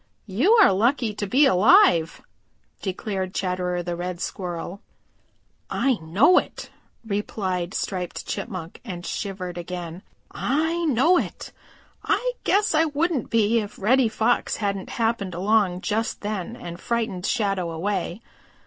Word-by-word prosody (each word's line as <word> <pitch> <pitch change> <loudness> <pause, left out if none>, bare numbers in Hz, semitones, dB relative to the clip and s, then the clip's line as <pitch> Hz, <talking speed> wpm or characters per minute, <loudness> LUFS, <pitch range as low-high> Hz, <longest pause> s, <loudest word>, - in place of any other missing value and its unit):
"You 235 - +3
are 430 - +6
lucky 230 +2 +1
to 205 0 -4
be 270 +9 +5
alive," 185 - +5 0.6
declared 190 -1 -3
Chatterer 180 -1 -1
the 175 0 -3
Red 175 0 -4
Squirrel. 180 +1 -5 0.9
"I 265 -4 +1
know 200 - +5
it," - - -8 0.3
replied 195 -3 -2
Striped 180 -3 -3
Chipmunk 185 -7 -5
and 180 -6 -7
shivered 185 -3 -4
again. 175 0 -6 0.3
"I 320 +5 0
know 315 +6 +4
it. - - -6 0.5
I - - +1
guess 415 -1 +2
I 315 +1 +4
wouldn't 305 -3 -1
be 230 0 +3
if 205 -2 -6
Reddy 240 +4 +3
Fox 225 +2 +1
hadn't 200 -3 -3
happened 225 -6 -1
along 190 -1 +2
just 220 +2 -2
then 210 +1 -4
and 175 -7 -8
frightened 225 -6 -2
Shadow 195 -6 0
away. 180 +3 -3
205 Hz, 130 wpm, -24 LUFS, 180-240 Hz, 0.9 s, are